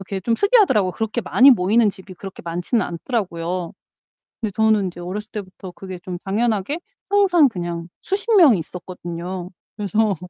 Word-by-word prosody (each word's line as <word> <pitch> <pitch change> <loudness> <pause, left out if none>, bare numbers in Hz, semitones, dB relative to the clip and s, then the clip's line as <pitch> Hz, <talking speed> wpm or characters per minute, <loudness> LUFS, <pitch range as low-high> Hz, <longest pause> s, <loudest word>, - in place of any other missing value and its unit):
이렇게 195 0 -5
좀 230 +5 +1
특이하더라고요. 395 - +4
그렇게 220 +5 -2
많이 260 +6 +6
모이는 215 +2 +3
집이 190 -1 -8
그렇게 195 +1 -10
많지는 175 +6 -1
않더라고요. 175 -3 -3 0.7
근데 220 -3 -2
저는 220 -3 +3
이제 175 -1 -8
어렸을 205 +5 -6
때부터 190 -2 -8
그게 185 -1 -9
좀 180 -1 -6
당연하게 215 - 0 0.3
항상 380 -7 +5
그냥 175 -6 -5
수십 410 +3 0
명이 285 - +7
있었거든요. 175 +1 -6 0.3
그래서 210 0 +1
195 Hz, 390 characters per minute, -21 LUFS, 180-230 Hz, 0.7 s, 명이